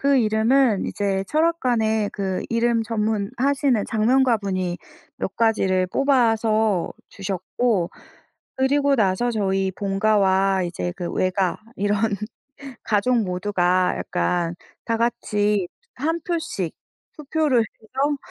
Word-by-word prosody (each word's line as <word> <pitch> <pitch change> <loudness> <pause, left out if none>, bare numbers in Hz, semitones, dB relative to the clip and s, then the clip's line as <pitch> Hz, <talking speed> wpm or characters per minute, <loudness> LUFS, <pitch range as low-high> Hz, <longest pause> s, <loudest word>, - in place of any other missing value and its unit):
그 280 0 +3
이름은 220 0 +3
이제 195 -2 -1
철학관에 245 -10 +1
그 190 -2 -3
이름 230 -1 +1
전문하시는 230 +4 0
작명가분이 215 -7 +1 0.4
몇 195 - -4
가지를 190 -5 +2
뽑아서 220 -6 +2 0.2
주셨고 195 0 -1 0.7
그리고 280 +1 +2
나서 210 +3 +1
저희 195 -2 0
본가와 195 -1 +2
이제 90 - -3
그 175 - -4
외가 185 0 0 0.2
이런 205 0 0 0.9
가족 225 +3 +2
모두가 180 -1 +1
약간 165 - -1 0.3
다같이 210 -4 0 0.3
한 325 +5 -1
표씩 320 - -3 0.4
투표를 300 -4 +1
해서 265 +7 -3
215 Hz, 225 characters per minute, -23 LUFS, 190-245 Hz, 0.9 s, 그